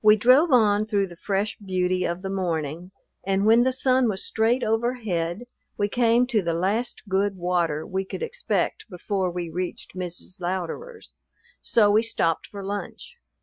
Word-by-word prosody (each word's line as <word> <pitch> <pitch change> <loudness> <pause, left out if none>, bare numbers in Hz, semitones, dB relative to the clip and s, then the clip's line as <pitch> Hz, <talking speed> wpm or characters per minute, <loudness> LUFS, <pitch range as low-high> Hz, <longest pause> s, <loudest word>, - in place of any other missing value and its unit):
We 215 0 +7
drove 255 +9 +5
on 215 -4 +4
through 205 -3 +1
the 175 -2 -11
fresh 200 +3 -2
beauty 185 -2 0
of 170 +2 -3
the 190 - -3
morning, 170 -3 -3 0.3
and 195 +1 +1
when 225 +2 +6
the 260 +1 +3
sun 255 -1 +2
was 190 -2 -3
straight 230 +3 +1
overhead 220 -5 -1 0.3
we 205 0 0
came 240 +2 +3
to 235 -4 +1
the 170 -2 -1
last 200 +8 -1
good 195 +1 +1
water 175 -4 0
we 190 0 -2
could 195 - -6
expect 475 - -2
before 185 0 -2
we 175 -1 -5
reached 180 +2 -5
Mrs. 180 0 -6
Louderer's; 190 - -5 0.5
so 210 -3 +4
we 215 +2 +5
stopped 165 -8 -1
for 200 -1 -8
lunch. 205 +1 -6
200 Hz, 165 wpm, -25 LUFS, 180-225 Hz, 0.5 s, We